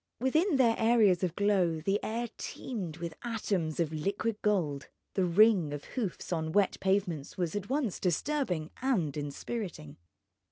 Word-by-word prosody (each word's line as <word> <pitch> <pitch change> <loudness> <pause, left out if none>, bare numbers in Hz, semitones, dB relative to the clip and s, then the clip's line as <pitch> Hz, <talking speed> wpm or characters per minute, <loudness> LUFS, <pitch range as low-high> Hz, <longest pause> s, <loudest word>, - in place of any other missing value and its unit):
Within 310 - +2
their 245 -4 +5
areas 220 -6 +4
of 175 -2 0
glow 190 -6 +2
the 195 +6 0
air 235 +2 -2
teemed 185 -11 -5
with 170 -1 -5
atoms 200 -9 -1
of 160 -2 0
liquid 200 +7 -2
gold. 165 -10 0 0.3
The 190 - +2
ring 180 -4 +4
of 145 - -5
hoofs 205 -7 -3
on 160 -1 -2
wet 200 -2 +2
pavements 190 -7 0
was 175 0 -1
at 205 +1 -4
once 265 - -1
disturbing 180 - -1
and 195 - +1
inspiriting. 145 - -5
195 Hz, 150 wpm, -31 LUFS, 165-225 Hz, 0.3 s, their